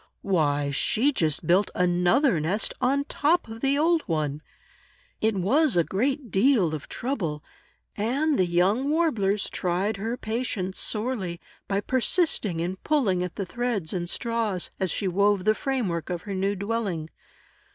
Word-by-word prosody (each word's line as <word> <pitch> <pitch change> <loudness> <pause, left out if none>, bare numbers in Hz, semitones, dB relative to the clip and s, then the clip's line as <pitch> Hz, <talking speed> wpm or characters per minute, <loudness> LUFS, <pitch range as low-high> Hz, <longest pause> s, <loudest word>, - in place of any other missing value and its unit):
Why, 145 -6 +1
she 235 - +2
just 160 - 0
built 185 +5 +3
another 180 - +3
nest 180 +8 -1
on 275 +3 +2
top 315 +3 +1
of 225 0 -9
the 275 +1 +2
old 330 +2 +3
one! 150 -3 -1 0.8
It 220 -1 +2
was 235 - +2
a 170 - +5
great 255 - -1
deal 195 - +3
of 150 -3 -6
trouble, 175 - -3 0.5
and 270 +8 0
the 185 - +3
young 195 +10 +2
Warblers 225 - +1
tried 190 +4 -1
her 225 +5 -3
patience 220 -6 -3
sorely, 210 -6 -2 0.3
by 200 0 0
persisting 235 - +1
in 180 +3 -3
pulling 215 -10 +1
at 180 -1 -4
the 195 - -3
threads 210 -4 -2
and 175 -2 -2
straws, 225 -6 -1
as 190 - 0
she 200 - -1
wove 200 +1 +2
the 215 - +5
frame 260 -1 -1
work 170 -3 -3
of 175 -1 -3
her 200 - -5
new 195 +2 0
dwelling. 200 -6 -3
200 Hz, 155 wpm, -26 LUFS, 180-250 Hz, 0.8 s, a